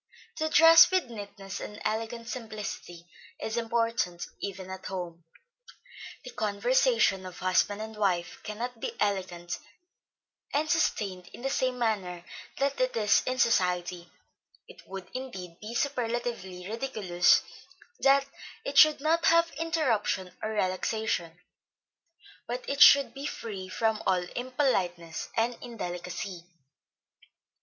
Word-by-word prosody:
To 315 -1 0
dress 325 +1 +8
with 370 -10 0
neatness, 200 -2 -7
and 210 - -7
elegant 225 +2 -2
simplicity 215 -7 -6 0.3
is 220 - -3
important, 230 -6 0 0.2
even 190 -1 -5
at 190 - -7
home. 175 -3 -6 1.0
The 250 - -8
conversation 220 -1 +2
of 185 -1 -9
husband 200 +3 +1
and 220 0 -8
wife 185 -5 -1
cannot 230 +3 -5
be - - -3
elegant, 185 -4 -2 1.0
and 300 +2 +2
sustained 200 - 0
in 240 - -11
the 270 - 0
same 255 -1 0
manner 190 -7 -1 0.3
that 275 -1 0
it 255 -2 +1
is 210 -2 +4
in 255 0 0
society; 180 -6 +1 0.6
it - - -14
would 190 -1 -7
indeed 190 -10 -7
be 220 +2 -7
superlatively 235 -9 -2
ridiculous 210 -7 +2 0.6
that 275 0 +4 0.4
it - - +3
should 305 -2 +7
not 330 +2 +2
have 335 0 +4
interruption 265 - 0
or 215 - -2
relaxation, 185 -3 -1 1.1
but 245 +1 -4
it 280 +1 -2
should 275 -4 +8
be 275 +1 -5
free 195 -8 -6
from 220 +2 0
all 180 -1 +2
impoliteness 190 - -1
and 235 +2 +1
indelicacy. 180 -5 -6
215 Hz, 120 wpm, -29 LUFS, 185-250 Hz, 1.1 s, dress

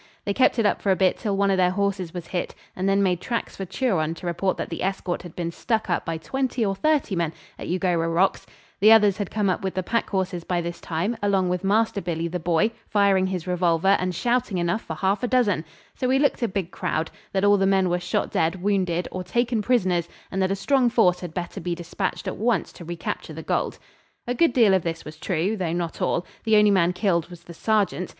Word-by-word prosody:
They 200 - 0
kept 255 +3 +3
it 225 - +2
up - - +1
for 200 - +2
a - - +4
bit 185 -1 +2
till 205 -3 -1
one 200 0 +3
of 190 - +2
their 180 -1 +4
horses 195 -2 -1
was 175 -2 -6
hit, 175 0 -4 0.2
and 190 +1 0
then 200 0 +3
made 180 -2 +1
tracks 235 -2 -3
for 195 - -5
Turon 180 -7 0
to 175 - -10
report 175 +2 -1
that - - -4
the - - -5
escort 190 -2 -2
had 175 -3 -11
been 170 -1 -3
stuck 220 +2 -1
up - - 0
by 165 -1 -2
twenty 255 +6 -1
or 195 - 0
thirty 285 -1 +1
men 170 -2 -1 0.3
at - - -6
Eugowra 175 -2 0
Rocks 180 +4 +1 0.3
the 215 +3 +7
others 210 -3 +6
had 205 -3 -3
come 210 -2 0
up 185 - 0
with 190 -1 -3
the 185 - -1
pack 230 +5 -1
horses 185 -3 -2
by 175 0 -1
this 170 0 -5
time, 175 +8 -2
along 195 -3 +2
with 180 +1 -1
Master 210 +1 +2
Billy 170 -2 -2
the 180 +1 -3
Boy 175 +6 +2 0.2
firing 200 -2 +3
his 185 -3 -3
revolver 180 +1 +2
and 185 -1 -2
shouting 240 -4 0
enough 175 +5 0
for 160 - -6
half 190 +6 0
a 250 - 0
dozen; 235 -10 +2 0.3
so 255 - -2
we 260 +1 +3
looked 285 -1 +2
a 235 - +2
big 190 -3 -3
crowd 160 +1 -2 0.2
that 190 0 0
all 205 0 +5
the 195 0 +2
men 190 -1 +3
were 175 0 0
shot 180 - -2
dead, 165 +3 0
wounded, 185 -4 0
or 185 - -4
taken 240 +2 0
prisoners, 185 -8 +1 0.2
and 190 - -1
that 190 - +2
a 195 - 0
strong 255 +4 +2
force 185 -7 +3
had 175 -3 -6
better 175 +1 -5
be 175 -1 -2
despatched 175 +3 -4
at - - -3
once 230 0 0
to - - -11
recapture 170 0 -5
the - - -7
gold. - - -1 0.5
A 245 - -1
good 295 +1 +3
deal 225 -6 +5
of 190 - +3
this 165 0 -4
was 155 0 -9
true, 180 +4 -1
though 180 -5 -2
not 170 -1 -3
all. 175 - 0 0.2
The 220 -1 +4
only 210 -1 +5
man 180 -3 +3
killed 180 -3 0
was 175 -1 -12
the 170 - -11
sergeant. 200 -1 0
190 Hz, 245 wpm, -24 LUFS, 175-210 Hz, 0.5 s, the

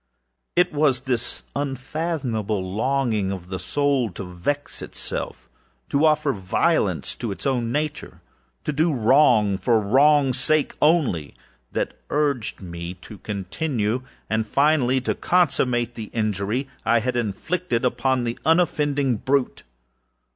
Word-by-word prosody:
It 180 -1 +3
was 145 -4 +2
this 125 -3 -2
unfathomable 135 - -2
longing 115 -4 0
of 90 -2 -6
the 95 -1 -4
soul 140 -5 +1
_to 95 +1 -6
vex 145 +12 -3
itself_âto 140 +2 -5
offer 150 -2 +3
violence 95 -4 0
to 115 - -4
its 95 -1 -7
own 125 -4 0
natureâto 150 +2 -3 0.6
do 160 +3 +3
wrong 115 -6 +4
for 115 -1 +3
the 105 - -4
wrongâs 140 +3 +5
sake 150 +3 +1
onlyâthat 140 - -1 0.2
urged 140 -9 0
me 85 0 -6
to 95 +3 -12
continue 105 - -2 0.3
and 110 0 0
finally 140 -1 +3
to - - 0
consummate 125 -9 +1
the 110 -3 -7
injury 110 +4 -1 0.2
I 120 - +3
had 125 +2 -1
inflicted 120 - -1
upon 130 0 +1
the 120 0 -3
unoffending 145 -6 +2
brute. 135 +3 0
125 Hz, 120 wpm, -23 LUFS, 110-145 Hz, 0.6 s, wrongâs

